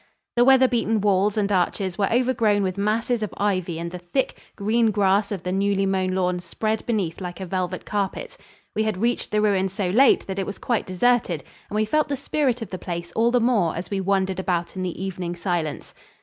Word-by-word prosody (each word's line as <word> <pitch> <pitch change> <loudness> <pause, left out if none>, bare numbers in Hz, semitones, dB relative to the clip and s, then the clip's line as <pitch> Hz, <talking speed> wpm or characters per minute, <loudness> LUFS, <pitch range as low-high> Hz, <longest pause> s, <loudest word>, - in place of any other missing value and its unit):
The 240 - +5
weather 265 0 +6
beaten 230 -3 +1
walls 205 +1 +2
and 205 -1 +1
arches 185 0 0
were 200 +1 0
overgrown 230 -4 +2
with 185 -1 -1
masses 220 +4 0
of 215 - -2
ivy 185 -5 0
and 170 +1 -4
the 180 - -6
thick, 180 +10 -1 0.2
green 225 +2 +2
grass 200 0 +2
of 190 -4 -4
the 180 - -2
newly 195 +1 +1
mown 190 -1 0
lawn 180 -1 0
spread 215 +5 -2
beneath 200 -7 -1
like 180 0 -6
a 190 - -4
velvet 185 0 -3
carpet. 200 -2 -3 0.4
We 215 - +1
had 215 -3 0
reached 235 +5 0
the 210 - +1
ruin 195 -2 +2
so 190 -1 -2
late 260 +7 +5
that 190 0 -4
it 190 - -2
was 205 - -5
quite 240 -3 -1
deserted, 185 - +1 0.3
and - - -5
we 215 0 +2
felt 305 +7 +1
the 280 - -1
spirit 265 -4 0
of 210 - -10
the 185 - -5
place 170 -1 -5
all 230 +1 +2
the 245 +1 +3
more 225 -9 +2
as 170 +4 -6
we 195 -1 0
wandered 190 -1 0
about 175 -2 -1
in 185 - -4
the 180 -2 -4
evening 180 -2 -4
silence. 170 -4 -3
200 Hz, 220 wpm, -24 LUFS, 185-220 Hz, 0.4 s, weather